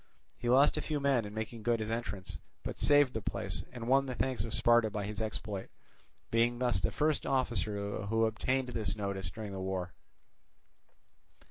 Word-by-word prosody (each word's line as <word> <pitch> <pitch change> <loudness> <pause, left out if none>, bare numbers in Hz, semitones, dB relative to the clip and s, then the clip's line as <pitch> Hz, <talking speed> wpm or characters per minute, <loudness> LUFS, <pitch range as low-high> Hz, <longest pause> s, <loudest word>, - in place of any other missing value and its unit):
He 120 - -1
lost 135 +4 +5
a - - 0
few 150 -2 -2
men 135 -5 +2
in 105 - -7
making 110 +1 -4
good 115 +1 +1
his 110 0 -3
entrance, 100 -5 -4 0.2
but - - -5
saved 145 -3 +5
the 110 - -2
place - - -2
and 120 -2 -6
won 135 +2 +4
the 125 - -3
thanks 130 -6 0
of 115 - -5
Sparta 120 0 +4
by 105 -1 -3
his 105 +1 -4
exploit, 105 -2 -4 0.6
being 115 +1 +3
thus 120 -6 +1
the - - +1
first 155 0 +1
officer 105 -6 -1
who 115 +1 +3
obtained 125 +4 0
this 110 -4 -1
notice 100 -3 -3
during 105 +2 -7
the 95 - -5
war. 95 -2 -3
115 Hz, 180 wpm, -32 LUFS, 100-125 Hz, 0.6 s, lost